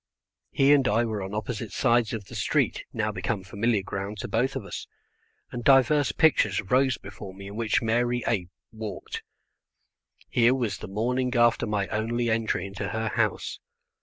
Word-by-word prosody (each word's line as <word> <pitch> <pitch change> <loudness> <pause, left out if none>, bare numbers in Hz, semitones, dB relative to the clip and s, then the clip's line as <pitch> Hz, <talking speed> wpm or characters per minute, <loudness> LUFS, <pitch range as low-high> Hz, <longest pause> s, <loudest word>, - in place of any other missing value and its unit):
He 140 +1 +4
and 135 -3 +4
I 115 +3 +2
were 110 -3 -3
on 95 +2 -5
opposite 110 0 -4
sides 120 -3 +2
of 110 -3 -4
the - - -13
street, - - 0
now - - -1
become 95 - -3
familiar 100 +2 0
ground 100 +2 -5
to - - -4
both 125 +4 0
of - - -4
us, - - -6 0.6
and 120 -1 -5
divers 140 +2 +5
pictures 110 -11 +3
rose 130 +5 +2
before 100 -1 -10
me 100 0 -10
in 100 - -9
which 115 0 +1
Mary 120 +2 +1
A 95 -7 0 0.2
walked. 110 -1 -6 1.1
Here 120 +2 +4
was 115 -6 -2
the - - -7
morning 125 +5 -1
after 120 -1 +3
my 105 -2 0
only 115 +2 0
entry 110 -4 0
into 100 0 -5
her 110 0 -2
house. - - -1
115 Hz, 170 wpm, -26 LUFS, 105-120 Hz, 1.1 s, divers